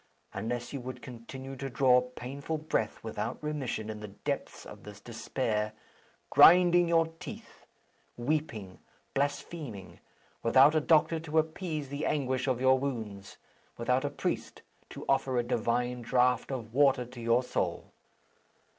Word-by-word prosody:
Unless 120 +6 -4
you 140 - -4
would 125 -1 -7
continue 130 +3 -8
to 135 +1 -4
draw 125 -1 +4
painful 130 +5 -5
breath 150 -8 -2
without 110 +1 -3
remission 135 -8 -3
in 110 -1 -5
the 105 - -7
depths 100 - -5
of - - -11
this 105 -1 -11
despair 110 -2 -2 0.6
grinding 175 0 +7
your 165 -1 +4
teeth, 180 -5 -10 0.5
weeping, 120 -8 -2 0.3
blaspheming 140 - -3 0.4
without 130 +6 +6
a 155 - +3
doctor 160 +1 +3
to 160 -1 -3
appease 155 -2 -1
the 140 +2 -2
anguish 130 -3 0
of 130 -2 +1
your 130 0 +4
wounds, 110 -8 -5 0.4
without 125 +3 +1
a 145 - 0
priest - - -4 0.3
to - - -8
offer 130 -2 +1
a 120 - +2
divine 120 +1 0
draught 125 +2 +2
of 115 -4 -5
water 135 -2 +4
to 120 0 -11
your 115 +2 +3
soul. - - -2
125 Hz, 140 wpm, -30 LUFS, 115-145 Hz, 0.6 s, grinding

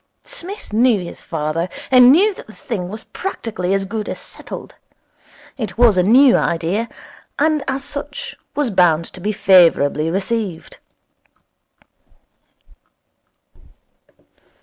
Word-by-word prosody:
Psmith 380 - -7
knew 230 -1 +3
his 175 -2 -9
father, 160 +2 -3 0.2
and 250 -1 +8
he - - +8
knew 390 +10 +5
that - - -13
the 215 - -13
thing 185 -7 -5
was 215 +2 -7
practically 220 - -4
as 195 0 -1
good 210 +1 -4
as - - -4
settled. - - -9 0.9
It 220 -2 -5
was 235 -4 +5
a 180 - +4
new 250 +8 +6
idea, 175 +8 -1 0.5
and 305 -1 +1
as 270 +1 -2
such 285 +1 -6 0.2
was 285 -5 0
bound 170 -4 +3
to 185 - -10
be 210 - -1
favourably 170 -7 +4
received. 195 -1 -3
215 Hz, 125 wpm, -19 LUFS, 180-255 Hz, 0.9 s, and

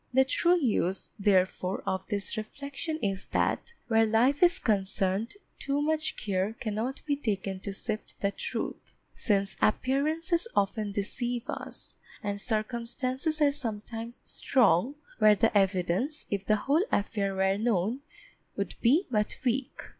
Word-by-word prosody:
The 265 +1 +5
true 345 +6 +3
use, 200 - 0
therefore, 190 -1 +1
of 190 0 -2
this 200 -1 -1
reflection 280 +8 -5
is 195 -1 -1
that 470 - 0
where 225 -1 +4
life 235 +6 +3
is 350 0 +5
concerned, 200 - 0 0.2
too 280 0 -1
much 310 +1 0
care 195 +1 -1
cannot 225 +3 -4
be 290 -1 +1
taken 195 -7 -2
to 200 - -5
sift 215 +2 -4
the 200 - +1
truth, - - -5 0.2
since 200 -4 0
appearances 310 - +1
often 205 +1 +1
deceive 240 +4 -2
us - - -7 0.3
and 205 -1 -2
circumstances 250 +7 -1
are 285 - +5
sometimes 230 -3 -4
strong 240 - +2 0.2
where 215 -1 +7
the 225 +2 +2
evidence, 195 - +1
if 200 -1 -2
the 215 - +5
whole 285 - +2
affair 200 -1 0
were 190 +1 +2
known, 220 +1 +1 0.6
would - - -2
be 290 +11 +4
but 210 -2 0
weak. 255 +3 -1
225 Hz, 140 wpm, -29 LUFS, 200-270 Hz, 0.6 s, where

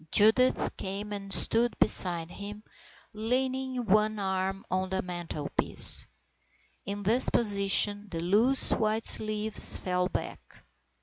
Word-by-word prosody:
Judith 220 +5 0
came 200 +2 -8
and 195 -1 -10
stood 230 +4 +3
beside 170 -2 +1
him, 210 +1 -12 0.5
leaning 255 +3 -6
one 215 +1 -2
arm 190 -1 -6
on 185 0 -5
the 190 0 -6
mantelpiece. 175 -5 +5 0.8
In 200 +1 -8
this 230 +6 0
position 205 -1 -2
the 165 - -8
loose 215 +10 +2
white 220 0 -4
sleeves 215 0 0
fell 180 0 -5
back. - - -11
205 Hz, 115 wpm, -24 LUFS, 190-220 Hz, 0.8 s, mantelpiece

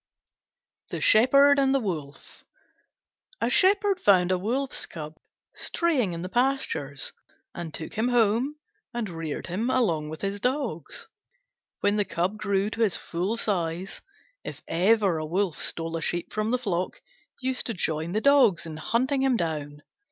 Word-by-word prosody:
THE - - -4
SHEPHERD 275 +5 +6
AND 270 0 +3
THE - - +3
WOLF 155 - -6 1.0
A - - 0
Shepherd 395 0 +4
found 185 -3 +4
a 185 - +3
Wolf's 255 +7 -2
Cub 155 -1 -8 0.4
straying 275 - 0
in 170 +1 -5
the - - -3
pastures, 240 - -1 0.4
and 170 -2 -6
took 160 +1 -7
him 220 +3 0
home 245 +4 +2 0.4
and 235 -3 -2
reared 165 -3 -5
him 210 +8 -2
along 170 -13 +1
with 155 0 -7
his 200 0 -2
dogs. 250 - -2 0.7
When 205 +1 +2
the 205 - +2
Cub 180 +5 -1
grew 200 0 0
to 225 - -4
his 210 -5 +2
full 185 +7 -2
size, 185 -3 -2 0.4
if - - -8
ever 190 0 +2
a 155 - -3
wolf 180 0 -1
stole 165 0 -2
a 165 - -3
sheep 175 +2 -2
from 215 +1 -1
the 250 - +2
flock, 185 -7 -2 0.4
he 260 - -2
used 260 - -2
to 230 - -2
join 160 0 -2
the 215 - 0
dogs 275 -12 +4
in 160 -1 -7
hunting 255 - 0
him 265 -3 +3
down. 150 -4 -3
200 Hz, 160 wpm, -26 LUFS, 165-250 Hz, 1.0 s, SHEPHERD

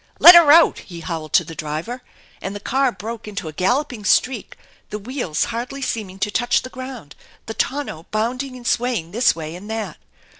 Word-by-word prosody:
"Let 350 - +11
her 340 -4 +8
out!" 330 +2 +6
he 170 -3 -10
howled 165 -2 -5
to - - +5
the 165 0 -9
driver, 160 +12 -5 0.4
and 195 +1 -5
the - - -5
car 265 +5 +1
broke 220 +3 -7
into 200 -5 -5
a 155 - -6
galloping 240 - 0
streak, 235 +3 +1 0.3
the 210 - -4
wheels 210 - -2
hardly 250 +4 -4
seeming 205 -7 -3
to 210 - 0
touch 240 +3 +1
the 255 - -8
ground, 255 - -8 0.3
the 225 - -5
tonneau 255 - -3
bounding 250 +5 -2
and 245 -1 -11
swaying 235 -10 0
this 230 -1 +3
way 160 0 -6
and 200 +4 -10
that. 220 -6 -4
225 Hz, 190 wpm, -21 LUFS, 180-255 Hz, 0.4 s, Let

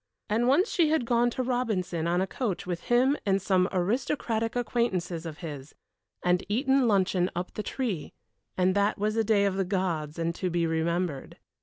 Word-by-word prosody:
And 230 +3 +2
once 285 +9 +4
she 330 -4 +3
had 315 -6 +1
gone 240 0 +3
to 255 +2 -3
Robinson 215 -10 -1
on 175 +2 +1
a - - +2
coach 205 -1 -3
with 175 -1 -4
him 255 +4 +3
and 195 -1 +2
some 185 0 +2
aristocratic 225 +3 -1
acquaintances 190 -9 -1
of 155 -2 -7
his, 145 -2 -8 0.5
and 180 0 +2
eaten 265 +3 +2
luncheon 190 -3 +2
up 175 +1 -4
the - - -3
tree, 215 - -3 0.5
and 185 0 +3
that 205 +2 +1
was 215 +2 0
a 225 - +2
day 205 -2 +3
of 195 -1 0
the 195 - +2
gods 175 -5 -2
and 165 0 -1
to 185 +1 -2
be 170 -1 0
remembered. 165 -2 -2
195 Hz, 185 wpm, -28 LUFS, 175-235 Hz, 0.5 s, once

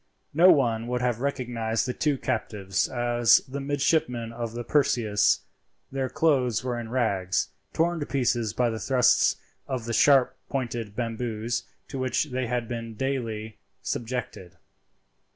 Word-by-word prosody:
No 170 +5 +7
one 115 -7 +3
would 125 0 -1
have 125 -2 0
recognized 120 -4 -1
the 125 - -2
two 145 0 0
captives 95 -6 -1
as 120 -1 +4
the 135 +2 -5
midshipmen 140 -4 0
of 115 -1 -4
the 120 0 -4
Perseus. 115 -6 +2 0.5
Their 135 -1 -2
clothes 130 -8 +2
were 125 -2 -2
in 115 -1 -6
rags—torn 120 - -1
to 145 - -4
pieces 120 -5 0
by 120 -2 +1
the 110 - -4
thrusts 125 -1 +3 0.3
of 125 -4 -3
the 115 - -3
sharp 135 0 +5
pointed 120 -6 -3
bamboos, 115 0 -3 0.2
to 135 - -5
which 130 +3 0
they 130 -1 -1
had 120 -1 -2 0.3
daily 120 -5 -2
been - - -20 0.3
subjected. 115 -7 -4
120 Hz, 140 wpm, -26 LUFS, 115-135 Hz, 0.5 s, No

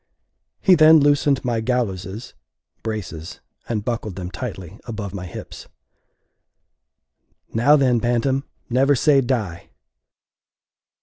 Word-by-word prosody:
He 190 - +5
then 160 -1 +7
loosened 145 -2 +2
my 120 -2 0
gallowses 110 -3 -3 0.5
(braces), 100 -7 -6 0.3
and 110 -3 -2
buckled 110 -5 -3
them 90 -1 -6
tightly 100 -5 -7
above 105 -5 -6
my 90 -2 -6
hips. - - -9 1.9
"Now, 125 +7 +5
then, 130 -5 +3
bantam, 125 +4 0 0.2
never 135 +4 +3
say 140 +2 +4
die!" 110 -9 -3
120 Hz, 105 wpm, -21 LUFS, 100-135 Hz, 1.9 s, then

